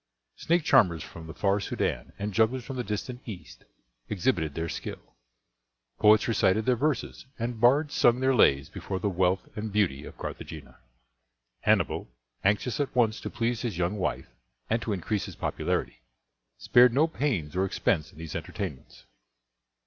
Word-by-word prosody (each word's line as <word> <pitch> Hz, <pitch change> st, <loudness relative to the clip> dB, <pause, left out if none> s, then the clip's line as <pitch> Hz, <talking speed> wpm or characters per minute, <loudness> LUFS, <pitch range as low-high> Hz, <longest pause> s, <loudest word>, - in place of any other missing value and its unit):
Snake 170 Hz, 0 st, +1 dB
charmers 90 Hz, -, +4 dB
from 80 Hz, -1 st, -10 dB
the 80 Hz, -, -7 dB
far 100 Hz, +3 st, +1 dB
Soudan 100 Hz, -, -2 dB
and 100 Hz, +1 st, -4 dB
jugglers 115 Hz, +4 st, +2 dB
from 135 Hz, -, -6 dB
the 125 Hz, -, -2 dB
distant 120 Hz, +4 st, -4 dB
East 105 Hz, -6 st, -10 dB, 0.4 s
exhibited 90 Hz, -, 0 dB
their 80 Hz, 0 st, -2 dB
skill. -, -, -7 dB, 0.8 s
Poets 105 Hz, 0 st, +5 dB
recited 110 Hz, -2 st, +2 dB
their 125 Hz, -, +3 dB
verses, 135 Hz, 0 st, -2 dB
and 115 Hz, -1 st, -4 dB
bards 145 Hz, +5 st, +4 dB
sung 120 Hz, +1 st, +4 dB
their 130 Hz, +1 st, +3 dB
lays 70 Hz, -, +4 dB
before 95 Hz, -, -5 dB
the 100 Hz, +2 st, -1 dB
wealth 90 Hz, +1 st, +1 dB
and 110 Hz, 0 st, -4 dB
beauty 95 Hz, -10 st, +1 dB
of -, -, -11 dB
Carthagena. -, -, -8 dB, 0.8 s
Hannibal, -, -, +1 dB, 0.3 s
anxious 105 Hz, +6 st, +1 dB
at 140 Hz, -3 st, -2 dB
once 115 Hz, -3 st, +2 dB
to -, -, -4 dB
please 120 Hz, -1 st, -1 dB
his 110 Hz, -8 st, -3 dB
young 90 Hz, +3 st, 0 dB
wife 95 Hz, -, -2 dB, 0.5 s
and 115 Hz, -, +2 dB
to 115 Hz, -, -3 dB
increase 100 Hz, +1 st, -1 dB
his -, -, -9 dB
popularity, -, -, -2 dB, 0.6 s
spared 125 Hz, -1 st, +5 dB
no 150 Hz, +3 st, +5 dB
pains 130 Hz, -, -2 dB
or 95 Hz, -, +2 dB
expense 85 Hz, -4 st, 0 dB
in -, -, -20 dB
these 80 Hz, -1 st, -7 dB
entertainments. 65 Hz, -, -6 dB
105 Hz, 160 wpm, -28 LUFS, 90-125 Hz, 0.8 s, Poets